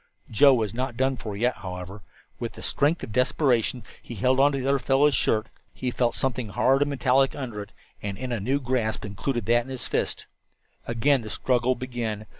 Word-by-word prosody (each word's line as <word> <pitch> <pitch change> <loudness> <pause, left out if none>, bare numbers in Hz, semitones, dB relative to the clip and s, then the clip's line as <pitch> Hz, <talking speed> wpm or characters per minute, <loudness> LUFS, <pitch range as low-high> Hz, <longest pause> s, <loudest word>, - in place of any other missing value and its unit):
Joe 135 +5 +6
was 110 -4 -1
not 125 0 -3
done 130 +1 +1
for 105 -5 -6
yet, 120 +4 +1
however. 90 +2 -7 0.4
With - - -4
the - - -11
strength 150 +4 +1
of - - -6
desperation 125 -1 +1 0.2
he 120 - -9
held 130 +6 +2
on 140 +1 +5
to 140 - -2
the 135 0 -2
other 140 0 +3
fellow's 140 +3 +3
shirt. 110 -3 +1 0.3
He 125 -1 -2
felt 120 -1 0
something 125 -4 -1
hard 135 +7 +2
and 145 - +2
metallic 135 0 +2
under 120 -7 -5
it, 100 - -10 0.3
and 100 -2 -4
in 130 -1 -5
a 120 - -1
new 130 +8 0
grasp 120 -5 -1
included 105 +3 -3
that 120 +1 +3
in - - -11
his 130 -3 -6
fist. - - -2 0.6
Again 125 +4 +2
the 110 - -8
struggle 125 +2 +1
began. 120 -4 -4
125 Hz, 205 wpm, -26 LUFS, 110-135 Hz, 0.6 s, Joe